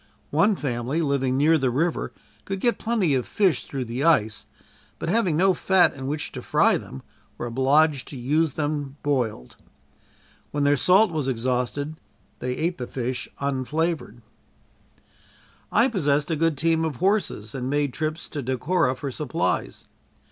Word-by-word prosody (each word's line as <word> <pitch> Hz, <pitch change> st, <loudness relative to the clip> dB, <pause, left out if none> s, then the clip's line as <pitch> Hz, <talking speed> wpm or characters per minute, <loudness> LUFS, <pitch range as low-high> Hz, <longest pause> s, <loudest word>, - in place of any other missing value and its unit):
One 200 Hz, +8 st, +3 dB
family 130 Hz, 0 st, -2 dB
living 135 Hz, -3 st, +1 dB
near 155 Hz, +3 st, +4 dB
the 130 Hz, -2 st, +1 dB
river 150 Hz, +1 st, -1 dB, 0.3 s
could 195 Hz, -1 st, -3 dB
get 235 Hz, 0 st, +1 dB
plenty 215 Hz, -9 st, +1 dB
of 130 Hz, -2 st, 0 dB
fish 185 Hz, -10 st, +1 dB
through 135 Hz, -3 st, -4 dB
the 120 Hz, +4 st, -3 dB
ice, 110 Hz, -10 st, +2 dB, 0.5 s
but -, -, -4 dB
having 185 Hz, -6 st, +2 dB
no 190 Hz, +2 st, +4 dB
fat 185 Hz, +1 st, +3 dB
in 135 Hz, -1 st, -6 dB
which 150 Hz, +2 st, -3 dB
to -, -, -7 dB
fry -, -, +3 dB
them, 65 Hz, -, -7 dB, 0.3 s
were -, -, -4 dB
obliged 135 Hz, +4 st, +2 dB
to 140 Hz, -, -7 dB
use 145 Hz, +4 st, +1 dB
them 145 Hz, -2 st, -3 dB
boiled. 120 Hz, -, -2 dB, 0.9 s
When 145 Hz, -1 st, -1 dB
their 145 Hz, 0 st, +4 dB
salt 185 Hz, -, +4 dB
was 155 Hz, -4 st, -2 dB
exhausted, 130 Hz, +4 st, -1 dB, 0.4 s
they 125 Hz, 0 st, -2 dB
ate 170 Hz, +2 st, -1 dB
the 125 Hz, -, -4 dB
fish 125 Hz, 0 st, -4 dB
unflavored. 140 Hz, -2 st, -2 dB, 1.5 s
I 230 Hz, +4 st, +4 dB
possessed 150 Hz, -, 0 dB
a -, -, +2 dB
good 160 Hz, -1 st, +1 dB
team 165 Hz, +2 st, +2 dB
of 160 Hz, -4 st, -2 dB
horses 185 Hz, -, 0 dB
and 130 Hz, -1 st, -3 dB
made 145 Hz, -2 st, 0 dB
trips 155 Hz, 0 st, -3 dB
to 145 Hz, -, -4 dB
Decorah 130 Hz, +3 st, 0 dB
for 140 Hz, 0 st, -4 dB
supplies. 140 Hz, 0 st, -2 dB
145 Hz, 155 wpm, -24 LUFS, 130-165 Hz, 1.5 s, near